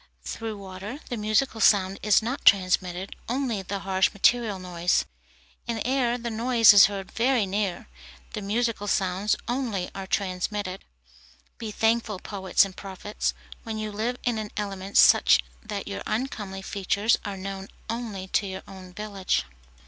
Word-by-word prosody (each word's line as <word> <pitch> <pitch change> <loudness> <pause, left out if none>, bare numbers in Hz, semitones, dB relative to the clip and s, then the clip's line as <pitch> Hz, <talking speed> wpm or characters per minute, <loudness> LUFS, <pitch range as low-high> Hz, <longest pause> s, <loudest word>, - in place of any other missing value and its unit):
Through 225 -2 -5
water 195 +6 -7
the 245 - -2
musical 220 +2 0
sound 195 -2 +4
is 210 +1 +4
not 250 +5 -3
transmitted, 185 -1 +3
only 245 -5 -1
the 195 +1 -4
harsh 190 -1 +2
material 220 0 +2
noise. 180 -1 0 0.6
In 235 -1 -1
air 250 -2 +1
the 235 -1 -4
noise 230 -1 +6
is 200 -2 +9
heard 195 -2 -6
very 240 -2 +2
near, 195 -2 -2 0.5
the 215 - -4
musical 215 +1 -1
sounds 190 +1 +1
only 235 -7 -2
are 195 -1 -6
transmitted. 190 0 -2 0.8
Be 225 - -4
thankful, 225 -1 +1
poets 190 0 +1
and 190 -2 -9
prophets, 195 +2 -4 0.3
when 225 -2 -5
you 215 0 -3
live 225 +4 -2
in 240 -3 0
an 215 -1 -4
element 195 -1 -3
such - - +7 0.2
that 210 -3 -5
your 200 - -5
uncomely 210 -5 -3
features 200 +3 +1
are 200 -2 -5
known 195 0 -6 0.2
only 225 -5 -4
to 200 - +1
your 190 0 -6
own 185 -2 -11
village. 200 -1 -1
205 Hz, 150 wpm, -26 LUFS, 190-225 Hz, 0.8 s, is